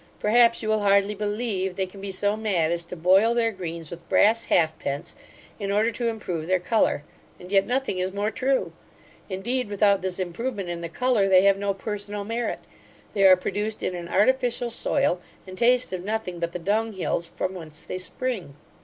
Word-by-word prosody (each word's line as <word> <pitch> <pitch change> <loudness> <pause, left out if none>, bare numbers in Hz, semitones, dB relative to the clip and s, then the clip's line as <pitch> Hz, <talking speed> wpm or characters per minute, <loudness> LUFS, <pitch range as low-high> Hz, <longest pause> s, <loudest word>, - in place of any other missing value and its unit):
Perhaps, 235 +2 +4
you 215 - -2
will 215 0 +2
hardly 200 0 +3
believe 205 -2 -2
they 190 - -1
can 195 +1 -12
be 200 - -5
so 205 +2 0
mad 190 -7 0
as 170 0 -1
to 175 - -7
boil 190 +7 +4
their 230 -1 +2
greens 170 -5 -6
with 170 0 -10
brass 230 +2 +4
halfpence, 160 -1 0 0.5
in 200 -1 -2
order 215 +3 +2
to 235 +2 -2
improve 180 -8 -3
their 185 0 +2
colour; 180 -5 +1 0.4
and 180 +1 -11
yet 195 -1 +3
nothing 255 -6 -1
is 185 +1 -1
more 205 +2 -1
true 265 +2 0 0.6
Indeed, 225 +5 -2
without 205 -1 +3
this 185 -1 -2
improvement 195 +2 -3
in 170 -1 -4
the 170 - -5
colour, 220 0 +1
they 185 0 +6
have 195 0 +4
no 200 -1 -1
personal 205 0 -5
merit. 230 +3 -3 0.5
They 200 -2 +3
are 185 -1 +8
produced 210 +4 -3
in - - -1
an 175 -1 -6
artificial 245 +2 +2
soil, 235 -6 +1 0.2
and 185 -1 -9
taste 245 0 +3
of 180 -1 -4
nothing 205 -4 -3
but 170 0 -2
the 180 - -5
dunghills, 200 -2 -1
from 185 - -4
whence 155 -4 -10
they 185 - -5
spring. 195 - -4
200 Hz, 190 wpm, -25 LUFS, 180-220 Hz, 0.6 s, are